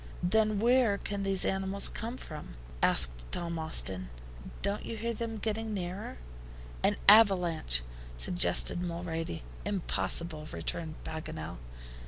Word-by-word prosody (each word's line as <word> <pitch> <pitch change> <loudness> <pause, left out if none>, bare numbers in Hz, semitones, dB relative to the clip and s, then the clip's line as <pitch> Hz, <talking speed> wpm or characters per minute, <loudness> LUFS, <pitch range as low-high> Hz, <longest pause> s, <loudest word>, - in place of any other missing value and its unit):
"Then 215 +3 +2
where 235 -2 +4
can 200 0 -4
these 195 -1 +3
animals 195 +1 +2
come 235 +3 -5
from?" 150 - -9 0.3
asked - - +3
Tom 170 -1 -3
Austin. 95 - -1 0.5
"Don't 200 +1 -1
you 230 - -5
hear 230 +2 -2
them 225 0 -4
getting 220 0 -2
nearer!" 180 - -5 0.6
"An 205 0 +2
avalanche," 180 - +5 0.3
suggested 175 - +3
Mulrady. 170 - -4 0.2
"Impossible," 170 -5 0
returned 160 -2 -4
Paganel. 80 - -6
180 Hz, 115 wpm, -31 LUFS, 160-210 Hz, 0.6 s, avalanche